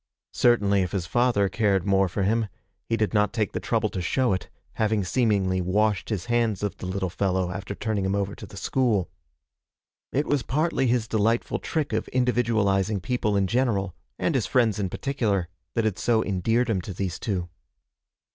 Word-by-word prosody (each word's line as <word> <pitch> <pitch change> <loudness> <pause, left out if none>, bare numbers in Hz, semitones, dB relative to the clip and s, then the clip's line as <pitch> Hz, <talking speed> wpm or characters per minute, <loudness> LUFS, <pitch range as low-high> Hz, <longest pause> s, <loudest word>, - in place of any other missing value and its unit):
Certainly 100 -5 +3
if 90 0 -2
his 95 -4 -1
father 120 0 +2
cared 95 -1 +1
more 95 -1 +3
for 95 +3 -2
him, 110 +3 +1 0.4
he 115 - +1
did 110 -1 0
not 105 -1 +3
take 110 -2 -1
the - - -3
trouble 110 -2 0
to 95 - -4
show 125 +6 +1
it, 95 - -4 0.3
having 110 -2 +2
seemingly 95 -4 +1
washed 105 +2 +1
his 105 -6 -2
hands 115 -4 0
of 105 - -1
the - - -6
little 95 0 -1
fellow 95 -2 0
after 100 +2 -5
turning 110 -3 -1
him 95 +1 0
over 100 0 -1
to - - -10
the 100 - -12
school. 115 -5 0 1.0
It 145 +3 +1
was 145 -2 +1
partly 150 0 0
his 120 -2 +1
delightful 115 +1 +1
trick 150 -7 -2
of 110 - -1
individualizing 110 -5 +1
people 105 0 0
in 100 - +2
general, 105 -4 0 0.2
and - - 0
his - - 0
friends 115 -5 +2
in 95 -2 -1
particular, 105 -9 -1 0.3
that 115 - +1
had 105 -4 -1
so 115 -2 +2
endeared 110 +6 +1
him 105 -6 0
to 95 - -7
these 95 -3 -3
two. 90 -5 -2
105 Hz, 185 wpm, -25 LUFS, 95-115 Hz, 1.0 s, Certainly